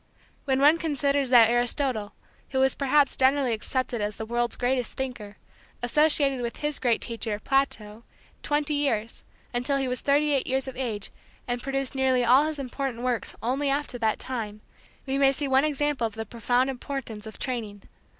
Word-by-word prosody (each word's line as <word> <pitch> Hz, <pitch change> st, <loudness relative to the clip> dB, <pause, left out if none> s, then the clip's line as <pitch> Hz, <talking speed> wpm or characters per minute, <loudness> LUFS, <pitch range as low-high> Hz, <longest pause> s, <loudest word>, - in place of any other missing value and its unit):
When 265 Hz, -1 st, +1 dB
one 300 Hz, +4 st, +5 dB
considers 285 Hz, -3 st, 0 dB
that 240 Hz, -3 st, +8 dB
Aristotle, 240 Hz, -3 st, 0 dB, 0.4 s
who 265 Hz, -1 st, +2 dB
is 265 Hz, -, +3 dB
perhaps 280 Hz, 0 st, +2 dB
generally 265 Hz, -2 st, +3 dB
accepted 240 Hz, +1 st, -2 dB
as 205 Hz, 0 st, -2 dB
the 220 Hz, -, -5 dB
world's 240 Hz, +1 st, -1 dB
greatest 250 Hz, -1 st, -1 dB
thinker, 235 Hz, -6 st, -5 dB, 0.5 s
associated 280 Hz, 0 st, +2 dB
with 235 Hz, -1 st, -4 dB
his 295 Hz, -1 st, -2 dB
great 235 Hz, -3 st, +1 dB
teacher, 225 Hz, -3 st, -3 dB
Plato, 225 Hz, -3 st, -1 dB, 0.4 s
twenty 295 Hz, 0 st, 0 dB
years, 235 Hz, -6 st, -1 dB, 0.3 s
until 245 Hz, +3 st, 0 dB
he 270 Hz, -1 st, -1 dB
was 250 Hz, 0 st, -3 dB
thirty 290 Hz, +1 st, +2 dB
eight 275 Hz, -2 st, +1 dB
years 265 Hz, +1 st, 0 dB
of 265 Hz, -, -6 dB
age 225 Hz, -6 st, -4 dB, 0.4 s
and 245 Hz, 0 st, -2 dB
produced 270 Hz, 0 st, -2 dB
nearly 260 Hz, -2 st, +2 dB
all 260 Hz, +5 st, +6 dB
his 310 Hz, -1 st, -3 dB
important 260 Hz, -2 st, -4 dB
works 250 Hz, -2 st, -2 dB
only 270 Hz, +4 st, 0 dB
after 280 Hz, -3 st, -2 dB
that 220 Hz, -2 st, +1 dB
time, 215 Hz, -5 st, -5 dB, 0.4 s
we 270 Hz, 0 st, -1 dB
may 275 Hz, -1 st, +5 dB
see 280 Hz, +1 st, -2 dB
one 265 Hz, +1 st, +4 dB
example 290 Hz, -4 st, 0 dB
of 220 Hz, -, -11 dB
the 225 Hz, 0 st, -4 dB
profound 245 Hz, +4 st, 0 dB
importance 245 Hz, -5 st, -6 dB
of 220 Hz, -, -9 dB
training. 220 Hz, -6 st, -4 dB
260 Hz, 175 wpm, -26 LUFS, 235-275 Hz, 0.5 s, that